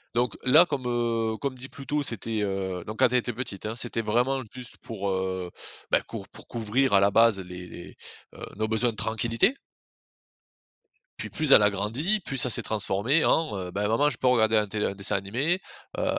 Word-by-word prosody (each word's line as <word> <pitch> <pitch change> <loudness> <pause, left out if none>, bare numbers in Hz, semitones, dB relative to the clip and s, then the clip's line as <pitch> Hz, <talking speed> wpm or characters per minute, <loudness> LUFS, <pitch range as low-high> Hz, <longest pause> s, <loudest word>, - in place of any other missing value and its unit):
Donc 120 0 0
là 155 +7 +7
comme, 140 -5 -3
heu, 115 -2 -1
comme 140 -2 -3
dit 130 +1 -9
plus 140 - -11
tôt 150 +2 0
c'était, 115 -2 -2
heu, 95 -3 -3
donc 110 +3 -7
quand 130 - +6
elle 125 - +4
était 120 0 -4
petite 110 -5 -6
hein. 110 - -3
C'était 120 -1 -1
vraiment 125 +5 0
juste 125 -1 -8
pour, 100 -4 -5
heu, 95 -1 -3 0.4
bah - - +4
cour - - -9
pour - - -13
couvrir 120 +3 0
à 100 - +7
la 100 +1 +3
base 115 -2 +4
les 90 -1 -9
les, 85 - -11 0.4
heu, - - -13 0.2
nos 110 +1 -1
besoins 110 +2 +1
de 110 - -14
tranquillité. 115 - +1 1.6
Puis - - -6
plus 155 -3 +1
elle 105 - +8
a 105 - +5
grandi 120 - -1
plus 135 -7 -5
ça 125 0 +4
s'est - - +4
transformé 110 +8 +1
en, 110 -11 +1
heu: 90 -1 -5
«Bah 105 +2 -1
maman 115 +7 +2
je 120 - -5
peux 130 - +1
regarder 110 -3 +3
à 105 - +5
la 105 - -4
télé 105 +1 -2
un - - -1
dessin 100 0 -1
animé?». 125 - 0 0.4
Heu, - - -1
115 Hz, 215 wpm, -26 LUFS, 100-130 Hz, 1.6 s, elle